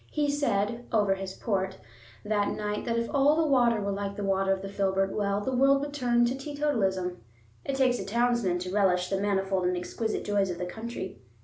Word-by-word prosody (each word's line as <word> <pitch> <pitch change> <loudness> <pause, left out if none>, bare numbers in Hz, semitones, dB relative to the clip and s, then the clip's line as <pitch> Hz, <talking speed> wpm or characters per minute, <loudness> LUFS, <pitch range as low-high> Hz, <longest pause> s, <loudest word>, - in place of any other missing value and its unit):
He 295 -1 0
said 235 -4 -1
(over 205 -3 +3
his 190 0 -6
port) 190 -3 -2 0.5
that 205 -1 0
night 210 0 -3
that 230 0 0
if 230 0 0
all 300 +3 +4
water 240 -4 +4
were 200 -1 -2
like 200 0 -3
the 205 - -4
water 195 0 +1
of 195 0 -1
the - - -4
filbert 195 -1 0
well 200 -1 0
the 260 +4 -2
world 275 +2 +4
would 285 0 -4
turn 240 -4 +2
to 240 - 0
teetotalism. 235 -11 -1 0.4
It 275 - -1
takes 255 -2 +2
a - - -3
townsman 235 -3 +1
to 180 +1 -4
relish 180 -3 +2
the 195 0 0
manifold 195 -2 0
and 180 0 +1
exquisite 220 +5 -3
joys 200 -2 +1
of 175 - -3
the 180 - -3
country. 190 - -6
205 Hz, 205 wpm, -28 LUFS, 195-245 Hz, 0.5 s, all